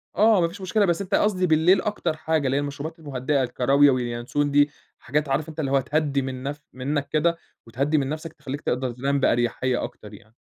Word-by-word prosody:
آه 215 -2 +5
ما 170 - +3
فيش 190 +4 -10
مشكلة 205 +2 +2
بس 175 +1 0
أنت 185 - -1
قصدي 185 -3 +2
بالليل 160 +4 +4
أكتر 175 -6 -2
حاجة، 155 -2 0
اللي 135 +2 +1
هي - - +1
المشروبات 145 +3 -6
المهدِّئة 135 -1 -1
الكراويا 135 +3 +4
والينسون 125 +4 -1
دي، 145 +1 +4 0.3
حاجات 145 +3 -1
عارف 150 +4 0
أنت 160 - -9
اللي 135 -3 -1
هو 135 - +4
تهدّي 145 0 0
من 130 0 -5
نف 145 +2 -5
منك 140 +2 -2
كده، 170 +3 +1 0.3
وتهدّي 140 +6 0
من 135 -1 0
نفْسك 155 +1 -5
تخلّيك 140 -1 -7
تقدر 125 0 -1
تنام 140 +3 -1
باريحية 120 +1 +1
أكتر 105 0 -8
يعني. 110 +2 -15
145 Hz, 205 wpm, -24 LUFS, 130-160 Hz, 0.3 s, آه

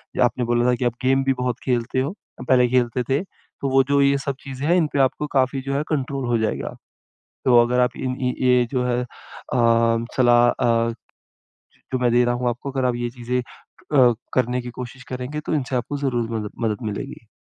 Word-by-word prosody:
जो 130 - +3
आपने 120 0 +1
बोला 120 0 +2
ना 125 0 +3
कि 125 +1 -2
आप 120 - +1
गेम 135 +1 +3
भी 135 0 +2
बहुत 125 -2 -1
खेलते 125 0 0
हो, 145 +9 -3 0.3
पहले 125 -1 +5
खेलते 125 0 +1
थे 135 +5 +2 0.4
तो 135 - 0
वो 135 0 +4
जो 140 0 +4
ये 140 0 +4
सब 140 0 -3
चीज़ें 135 +1 -5
हैं, 175 - +4
इन 170 -4 +3
पे 140 - +1
आपको 135 +3 +1
काफ़ी 130 +1 +1
जो 135 +1 -4
है, 145 - 0
कंट्रोल 140 -3 -2
हो 120 -1 +2
जाएगा। 110 -1 -2 0.7
तो 125 -2 +6
अगर 125 +1 +1
आप 125 0 +4
इन 130 -1 -2
इन 125 -1 -1
ये 125 -1 +4
जो 125 -2 0
है, 125 0 0
अ, - - -6 1.1
सलाह 120 -1 +5
अ, 115 -1 +1 1.0
जो 130 - +1
मैं 125 -1 +2
दे 120 0 +4
रहा 120 0 +1
हूँ 125 0 -1
आपको 125 +4 -4
अगर 130 -1 -1
आप 125 - +1
ये 120 0 -3
चीज़ें 125 0 -2 0.5
अ, 125 -4 +6 0.2
करने 125 0 +1
की 120 - -7
कोशिश 125 +1 -8
करेंगे, 130 +4 -4
तो 155 - -3
इनसे 135 -3 -1
आपको 125 +4 -2
ज़रूर 120 -5 -1
मद 110 -2 -3
मदद 110 +2 -1
मिलेगी। 115 +3 -6
125 Hz, 215 wpm, -22 LUFS, 120-135 Hz, 1.1 s, तो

